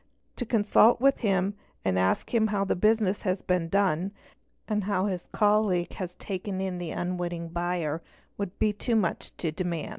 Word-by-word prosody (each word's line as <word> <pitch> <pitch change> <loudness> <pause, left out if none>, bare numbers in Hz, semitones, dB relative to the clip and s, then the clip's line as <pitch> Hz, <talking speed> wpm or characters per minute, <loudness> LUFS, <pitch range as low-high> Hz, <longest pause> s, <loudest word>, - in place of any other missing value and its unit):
To 245 - -3
consult 220 +1 +5
with 275 +2 +4
him 195 -3 +1 0.3
and 95 -1 +2
ask 95 - +1
him 220 -2 +4
how 200 -2 0
the - - +1
business 210 0 +2
has 185 -1 -1
been 180 -2 0
done 195 0 +1 0.5
and 210 -3 0
how 200 -2 +1
his 185 -4 -3
colleague 205 -4 +2
has 180 -2 -5
taken 190 -1 -4
in 190 -2 -2
the 175 -2 -4
unwitting": 175 -1 -3
buyer, 170 -2 -2 0.3
would 200 -2 -5
be 215 -1 +2
too 230 +3 -1
much 195 -6 -1
to 165 - -1
demand. 170 -1 -3
190 Hz, 175 wpm, -28 LUFS, 175-210 Hz, 0.5 s, consult